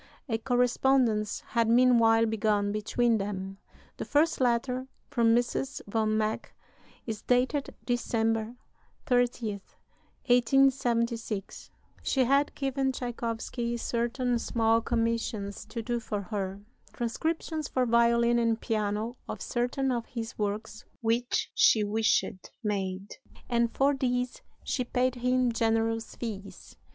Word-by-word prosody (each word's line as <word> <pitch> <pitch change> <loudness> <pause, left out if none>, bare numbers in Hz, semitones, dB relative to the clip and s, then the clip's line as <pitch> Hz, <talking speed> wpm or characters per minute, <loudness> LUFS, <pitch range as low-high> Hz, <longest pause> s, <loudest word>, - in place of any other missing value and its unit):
A 225 -3 -1
correspondence 245 -2 +2
had 230 -2 +1
meanwhile 230 -2 +5
begun 210 -2 +1
between 220 +2 +1
them 195 -1 -4 0.4
(the - - -3
first 310 0 +2
letter, 250 +1 +1 0.2
from 230 -1 +4
Mrs. 245 +3 -1
von 215 +1 0
Meck, 215 0 -2 0.5
is 220 -3 -4
dated 255 +3 0
December 225 -1 0 0.5
30, 245 -6 0 0.6
1876); 235 -4 +1 0.3
she 265 - +2
had 275 +3 +2
given 270 -1 0
Tschaikowsky 235 -1 -3
certain 240 +1 -1
small 225 0 +2
commissions 230 -3 -2
to 230 0 -6
do 240 +1 -1
for 210 -2 -3
her 195 -1 -4 0.3
transcriptions 315 +6 -2
for 255 -1 0
violin 235 0 +3
and 230 -1 +1
piano 215 +1 -2
of - - -4
certain 250 +2 -1
of 235 -2 -2
his 230 -2 -6
works 210 +1 -3 0.2
which 235 +2 0
she 430 - +5
wished 210 -3 0
made 195 - -3 0.3
and 235 -1 +1
for 280 +1 +2
these 250 -2 -1 0.2
she 255 - -1
paid 250 +1 0
him 250 0 +1
generous 225 0 0
fees. 205 -4 -7
235 Hz, 115 wpm, -29 LUFS, 220-250 Hz, 0.6 s, meanwhile